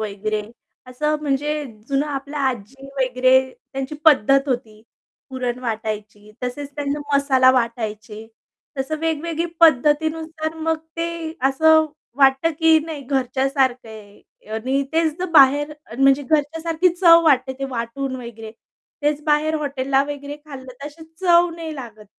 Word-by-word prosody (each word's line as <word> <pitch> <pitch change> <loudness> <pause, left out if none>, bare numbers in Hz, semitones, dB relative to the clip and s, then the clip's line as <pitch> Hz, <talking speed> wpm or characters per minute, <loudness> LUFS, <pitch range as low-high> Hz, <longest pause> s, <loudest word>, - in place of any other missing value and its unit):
वगैरे 215 0 -3 0.5
असं 300 +4 -1
म्हणजे 295 +1 -1 0.2
जुनं 280 +1 0
आपल्या 285 +1 -5
आजी 260 +3 -7
वगैरे 255 +1 +3 0.2
त्यांची 270 +2 -4
पद्धत 275 -2 +4
होती. 225 -4 -4 0.5
पुरण 250 -2 -3
वाटायची, 215 -3 -5
तसेच 275 +3 -4
त्यांना 285 0 -2 0.2
मसाला 265 -2 +4
वाटायचे. 220 -3 -3 0.5
तसं 290 +4 -2
वेगवेगळी 325 +1 -2
पद्धतीनुसार 315 +2 +2
मग 320 0 -1 0.2
ते 335 0 -1 0.4
असं 315 +3 +4 0.3
वाटतं, 270 +3 +4
की 325 -1 +5
नाही 320 -3 -6
घरच्यासारखं 265 -1 0
आहे 210 -1 -16
आणि 260 +5 -1
तेच 320 -1 +2
जर 360 - -2
बाहेर 290 -1 +5 0.3
म्हणजे 275 +1 +4
घरच्यासारखी 320 +4 +1
चव 335 -2 +6
वाटते 265 -4 +3
ते 275 - -3
वाटून 255 +3 -4
वगैरे. 230 -3 -9 0.5
तेच 295 0 0
बाहेर 305 0 +2
हॉटेलला 275 -2 0
वगैरे 290 0 -6
खाल्लं 270 -4 -10
तर 275 +3 -9
तशी 310 +2 -11 0.2
चव 350 -1 +4
नाही 325 -2 -6
लागत 230 -6 -10
275 Hz, 130 wpm, -21 LUFS, 250-310 Hz, 0.5 s, चव